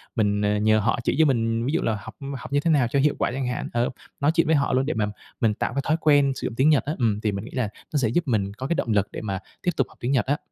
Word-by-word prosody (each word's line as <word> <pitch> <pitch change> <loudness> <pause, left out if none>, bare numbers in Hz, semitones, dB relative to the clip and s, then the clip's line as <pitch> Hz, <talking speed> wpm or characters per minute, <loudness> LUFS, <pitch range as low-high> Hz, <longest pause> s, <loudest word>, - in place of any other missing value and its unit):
mình, 105 -3 +1
ờ, 105 0 +1
nhờ 110 +1 +3
họ 110 +3 +1
chỉ - - +1
cho 160 - +6
mình, 115 -4 +1
ví 140 - -1
dụ - - +1
là 110 -2 0
học - - -10 0.2
học - - -10
như 145 - +4
thế 165 +3 +1
nào 135 -6 +3
cho 140 +3 0
hiệu 145 +1 +3
quả - - +1
chẳng 130 0 -2
hạn, 125 - -3
ờ, 120 +1 +1 0.3
nói 145 +2 +3
chuyện 165 - +3
với 160 - +4
họ 140 -1 +1
luôn, 130 +1 +2
để 155 - -1
mà 110 -1 0 0.4
mình 110 -3 +3
tạo - - -2
cái 140 - 0
thói 155 - +2
quen 145 -3 +4
sử - - -3
dụng 115 - -6
tiếng 135 +5 +4
Nhật 150 -3 +4
á. 150 - -1
Ừm, 110 -4 +1
thì 110 - 0
mình 100 +1 -5
nghĩ - - -10
là 125 -5 -1 0.2
nó - - +2
sẽ 130 -5 +2
giúp 165 +10 +1
mình 100 -5 0
có 130 +5 -5
cái 170 - 0
động - - -1
lực 105 -1 +2
để - - -6
mà 100 -3 -3 0.2
tiếp 175 - +2
tục 135 - +2
học - - -20
tiếng 120 - -1
Nhật 135 -3 +2
á. 145 +2 +1
125 Hz, 335 wpm, -24 LUFS, 110-145 Hz, 0.4 s, cho